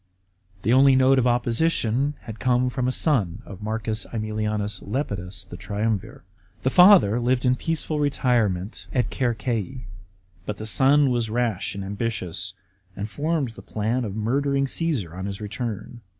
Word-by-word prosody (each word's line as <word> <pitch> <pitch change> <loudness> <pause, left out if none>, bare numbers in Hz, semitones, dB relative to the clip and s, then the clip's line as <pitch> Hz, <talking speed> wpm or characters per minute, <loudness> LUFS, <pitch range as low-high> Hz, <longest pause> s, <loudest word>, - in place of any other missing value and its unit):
The 115 - +3
only 135 +1 +6
note 130 +1 +5
of 125 - +2
opposition 125 +2 +1
had 110 -1 -9
come 125 0 +2
from 125 0 -1
a - - +1
son 115 - +1
of 95 -2 -10
M. 105 - -7
^Bmilins 110 -2 -2
Lepidus, 100 -7 -3
the 90 - -9
triumvir. 100 +2 -3 0.4
The 130 - +1
father 180 - +7
lived 125 +1 +1
in 125 0 +4
peaceful 155 +1 -2
retirement 120 -9 0
at 125 -4 0
Circeii, 120 0 -2 0.6
but 105 - -3
the 110 - -6
son 135 +4 +4
was 120 -2 0
rash 115 -5 -1
and 100 -1 -5
ambitious, 100 -3 -3 0.4
and 100 - -4
formed 150 +2 -1
the 115 - -12
plan 110 +4 -2
of 105 -3 -4
murdering 140 +5 +1
Caasar 135 - -2
on 95 +2 -5
his 100 0 -5
return. 110 +1 -5
115 Hz, 150 wpm, -24 LUFS, 105-130 Hz, 0.6 s, father